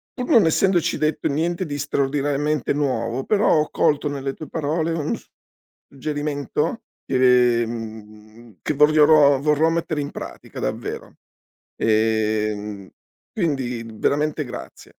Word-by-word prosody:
pur 250 -1 -4
non 220 -7 +6
essendoci 175 +1 +2
detto 155 0 0
niente 170 +4 -1
di 145 0 -4
straordinariamente 145 +1 0
nuovo, 130 -3 -1
però 210 -1 +2
ho 150 - 0
colto 145 0 +1
nelle 135 -1 -3
tue 155 - -10
parole 160 +1 -1
un 155 -3 -1
s - - -15 0.6
suggerimento 145 - -3 0.2
che, 125 -2 +4
mhmm, 110 0 -9
che 155 - -1
vogliono 150 -1 +5
vorrò 150 +2 +3
mettere 165 -2 -1
in 140 - -4
pratica - - -9
davvero. - - -5 0.6
Ehm, 110 -2 0 0.4
quindi 130 - -2
veramente 150 +6 0
grazie. 125 - -9
145 Hz, 120 wpm, -22 LUFS, 120-155 Hz, 0.6 s, non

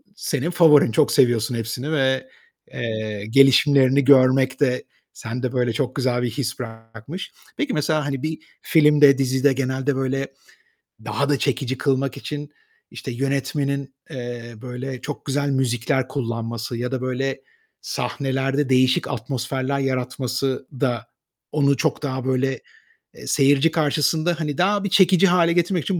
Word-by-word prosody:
senin 150 -5 -2
favorin, 160 -8 +5
çok 145 +6 +2
seviyorsun 120 -1 +2
hepsini 115 +6 -4
ve, 135 - +1 0.5
eee, 110 -3 -4
gelişimlerini 135 +1 +5
görmek 130 -1 +4
de 125 -3 +1 0.3
sende, 125 +2 -4
böyle, 125 -2 0
çok 130 +2 -2
güzel 125 -3 0
bir 125 - -1
his 125 +2 -4
bırakmış. 115 - -8 0.3
Peki, 295 -4 -1
mesela, 150 0 0
hani, 135 -2 -3
bir 155 0 -2 0.2
filmde, 150 -3 +5
dizide 135 +1 +2
genelde 130 +1 -1
böyle 135 +1 -1 0.8
daha 140 0 -1
da 145 -2 +2
çekici 130 -2 -1
kılmak 135 -2 0
için, 145 0 -6 0.4
işte, 130 - -7
yönetmenin, 140 +1 -2 0.2
eee, 120 -2 -7
böyle 125 0 -6
çok 145 - -7
güzel 140 +1 -1
müzikler 130 0 0
kullanması 115 -3 -4
ya 125 +2 -4
da, 130 - -2
böyle, 130 +1 -2 0.4
sahnelerde 135 0 -2
değişik 130 0 +3
atmosferler 130 +2 -3
yaratması 130 0 -2
da 120 -4 -1 0.5
onu 140 -2 +2
çok 155 +1 -1
daha, 130 -3 -3
böyle, 130 0 0 0.7
seyirci 140 +2 +3
karşısında, 155 +2 +1
hani, 150 -3 -3
daha 200 +3 +2
bir 200 - -1
çekici 190 -1 +5
hâle 175 -2 +3
getirmek 175 -1 +1
için 190 -3 -1
135 Hz, 135 wpm, -22 LUFS, 125-145 Hz, 0.8 s, favorin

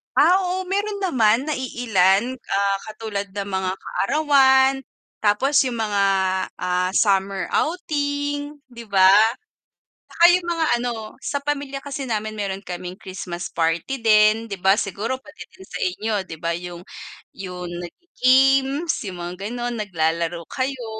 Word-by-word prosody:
Ah, 370 - +5
oo 370 0 -2
meron 405 +1 -1
naman 235 - +3
na - - +1
iilan, 235 -1 +1
ah, 200 -3 0
katulad 215 -2 -5
ng 200 -1 -4
mga 190 -1 -1
kaarawan 270 +2 +3 0.5
tapos 265 +7 +3
yung 235 -3 -2
mga, 205 -2 0 0.6
ah, 180 0 0
summer 195 -2 +1
outing, 290 -3 -2
'di 235 -1 -11
ba? 190 -1 +5 1.0
Tsaka 340 - -1
yung 360 -1 0
mga 330 -2 0
ano 245 0 -2 0.3
sa 285 - -2
pamilya 280 -1 -3
kasi 280 -1 -5
namin 215 -1 -3
meron 195 -1 -4
kaming 180 0 -6
Christmas 180 -2 -6
party 165 +11 -1
din, 215 0 +4
'di 200 - -4
ba? 195 +1 +5
Siguro 215 +6 -3
pati 300 +2 -12
din 190 - -13
sa - - -7
inyo 210 +4 -2
'di 160 - -8
ba? 170 0 -1
Yung, 175 -1 -8 0.5
yung 180 -2 -6
nagi-games, 270 - +2 0.2
yung 180 - -8
mga 175 +1 -5 0.2
ganon 240 0 -3
naglalaro 170 -3 -1
kayo. 260 -2 -3
220 Hz, 140 wpm, -22 LUFS, 190-275 Hz, 1.0 s, Ah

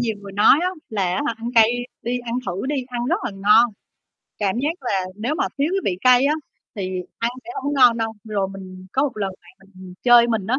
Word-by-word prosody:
nhiều 225 -3 -1
người 200 -1 -10
nói 205 +8 +5
á 365 - +2 0.2
là, 210 -3 -2
á 280 - -1
hả, 235 - -1
ăn 230 +1 -5
cay 225 -1 +6 0.3
đi 245 +2 -1
ăn 240 -1 -5
thử 190 +7 -3
đi, 290 +2 -1
ăn 240 -1 -3
rất - - +2
là - - -2
ngon, 210 +4 +4 0.7
cảm 200 +1 0
giác 300 +5 -2
là 200 -6 0 0.2
nếu 235 +8 -2
mà - - 0
thiếu 285 +2 +2
cái 390 - +1
vị 180 - -6
cay 255 +3 +5
á 300 - +2 0.4
thì 185 -2 -3 0.2
ăn 230 +1 0
sẽ 355 - -9
hông 285 +1 -1
có 275 - -1
ngon 245 -2 +7
đâu. 225 -1 -2
Rồi 205 -3 -1
mình 185 -1 -10
có 270 - +2
một 285 -5 -2
lần 195 -2 -2
bạn 195 0 -21
mình 185 -1 -11
chơi 240 -1 +7
mình 220 -4 -1
á, 250 +5 +1
230 Hz, 250 wpm, -21 LUFS, 195-250 Hz, 0.7 s, ngon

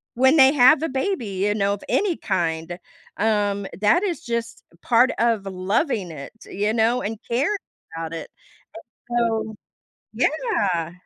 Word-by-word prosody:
When 265 +5 +4
they 265 0 +7
have 280 +3 +6
a 325 - -1
baby, 270 - -2
you 200 +1 -1
know, 200 -1 +1
of 205 - -7
any 390 -5 +1
kind, 170 -3 -2 0.4
um, 205 -2 0
that 215 - +4
is 350 -4 -2
just 235 -1 -4 0.2
part 245 +2 +4
of 225 -3 +1
loving 195 - -1
it, 140 -3 -9
you 210 +2 -2
know? 230 +2 +2
And 215 +2 -4
caring 285 - +1 0.4
about 165 0 -5
it, 165 - -6 0.8
and 240 - -1
so 220 -2 -1 0.6
Yeah. 185 - 0
220 Hz, 145 wpm, -22 LUFS, 195-260 Hz, 0.8 s, they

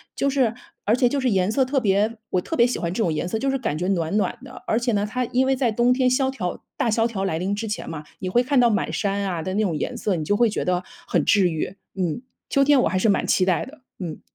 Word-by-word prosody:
就 275 - +1
是 260 -5 +2 0.3
而 215 - +3
且 250 0 +3
就 280 +3 0
是 260 -1 +1
颜 190 -2 +2
色 265 +4 +3
特 270 +2 +1
别 210 0 +1
我 185 - +1
特 325 - -4
别 235 - +6
喜 250 - -2
欢 170 - -2
这 225 - -1
种 170 -7 +1
颜 155 - -2
色， 220 +5 -2
就 270 +2 0
是 270 - +1
感 225 - -2
觉 180 +3 -2
暖 170 -2 0
暖 230 +3 0
的。 260 -1 -11
而 220 - +2
且 240 0 0
呢， 205 -1 0
它 250 +2 -1
因 255 +2 +1
为 270 0 +2
在 255 -3 +1
冬 240 +3 +3
天 255 0 +2
萧 265 +1 +2
条 185 -10 -4
大 230 - 0
萧 225 +1 +2
条 205 -5 -3
来 160 -5 -1
临 190 +3 -1
之 220 +2 -4
前 210 - -4
嘛， 155 -2 -6 0.2
你 185 - -4
会 240 +6 +3
看 265 +1 +2
到 240 -1 +5
满 210 - 0
山 200 -1 -1
啊 180 -4 -2
的 185 +4 -4
那 210 - +1
种 175 -7 0
颜 - - -3
色， 200 - 0
你 155 -2 -3
就 205 - +2
会 235 0 +3
觉 - - -3
得 180 0 0 0.2
很 165 -4 +1
治 190 -3 +4
愈， 165 +4 -4 0.2
嗯。 180 +1 -2 0.3
秋 275 - +3
天 280 -2 +5
我 - - +3
还 185 - 0
是 215 +4 +2
蛮 200 - +1
期 185 - +3
待 185 -2 +1
的， 285 +2 -14 0.2
嗯。 170 -4 -6
215 Hz, 320 characters per minute, -23 LUFS, 185-250 Hz, 0.3 s, 别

